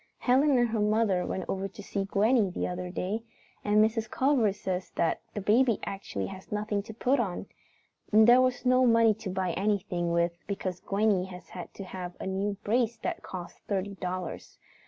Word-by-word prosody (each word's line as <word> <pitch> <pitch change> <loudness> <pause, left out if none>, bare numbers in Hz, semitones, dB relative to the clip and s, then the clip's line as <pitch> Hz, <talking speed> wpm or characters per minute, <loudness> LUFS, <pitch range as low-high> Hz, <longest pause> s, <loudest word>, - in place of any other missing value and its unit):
Helen 270 +2 +3
and 240 -1 +3
her 220 0 -1
mother 210 -3 +2
went 190 - -3
over 195 0 -2
to 195 +2 -11
see 195 0 -2
Gwenny 210 +2 +3
the 180 - -3
other 180 0 -4
day, 190 +5 -2 0.4
and 210 +1 +5
Mrs. 220 0 -2
Culver 260 -6 +2
says 185 -2 -4
that 165 - +1 0.2
baby 230 +1 +4
actually 195 - -4
has 185 - -9
nothing 210 -1 -1
to 215 +2 -10
put 255 +4 +2
on. 195 -7 -2 0.7
And 215 +1 +7
there 245 +2 +7
is 255 0 -5
no 255 0 +5
money 230 -1 +5
to 215 -1 -7
buy 185 -1 -1
anything 190 -3 -1
with 170 0 +1
because 185 -3 -3
Gwenny 200 -2 +1
has 180 -1 -11
had 180 -2 -8
to 195 - -6
have 180 -1 -7
a - - -5
new 195 +1 -1
brace 235 +1 +1
that - - -2
cost 175 -2 -8
thirty 200 0 -1
dollars. 185 -2 -5
200 Hz, 185 wpm, -29 LUFS, 185-225 Hz, 0.7 s, And